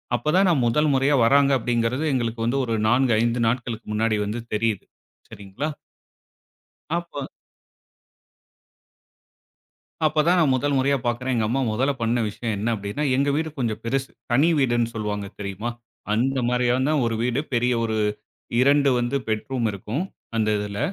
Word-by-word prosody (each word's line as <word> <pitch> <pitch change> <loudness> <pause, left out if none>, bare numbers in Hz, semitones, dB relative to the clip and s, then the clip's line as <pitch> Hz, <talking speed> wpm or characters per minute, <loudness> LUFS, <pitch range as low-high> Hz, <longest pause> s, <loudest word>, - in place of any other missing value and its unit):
அப்போ 120 +6 -2
தான் 195 +1 +5
நான் 150 -8 +2
முதல் 150 +6 +2
முறையா 135 +2 +3
வர்றாங்க 140 +3 +4
அப்படிங்கிறது 120 +4 0
எங்களுக்கு 115 -2 -1
வந்து 135 +4 +1
ஒரு 115 - -1
4 125 +1 +3
5 120 +1 +1
நாட்களுக்கு 115 -1 -2
முன்னாடி 110 0 +1
வந்து 110 +4 -3
தெரியுது, 110 -2 -1 0.4
சரிங்களா? 100 +10 -5 1.3
அப்ப 170 -5 -5 2.8
அப்ப 155 0 +3
தான் 180 +1 +4
நான் 145 -6 +3
முதல் 145 +2 0
முறையா 140 +1 +2
பார்க்றேன். 125 +2 -1
எங்க 110 -2 +1
அம்மா 135 +4 0
முதல்ல 135 +6 +1
பண்ண 115 +1 +1
விஷயம் 110 +1 -3
என்ன 110 +4 -1
அப்டின்னா, 100 +8 -4
எங்க 140 +1 +2
வீடு 160 +1 -1
கொஞ்சம் 115 -4 -2
பெருசு. 135 +3 -1 0.2
தனி 140 +7 +4
வீடுன்னு 120 -3 +2
சொல்வாங்க 105 -2 -3
தெரியுமா? 100 +3 -4 0.4
அந்த 130 +5 +1
மாரியான 125 +4 +1
ஒரு 115 -1 0
வீடு. 125 +2 0
பெரிய 125 +1 +2
ஒரு 110 -1 -1 0.6
2 140 +1 +4
வந்து 120 +3 -1
பெட் 110 -1 -1
ரூம் 120 -3 0
இருக்கும். 105 - -3 0.3
அந்த 110 -1 +1
இதுல. 100 -1 -4
120 Hz, 150 wpm, -23 LUFS, 115-135 Hz, 2.8 s, தான்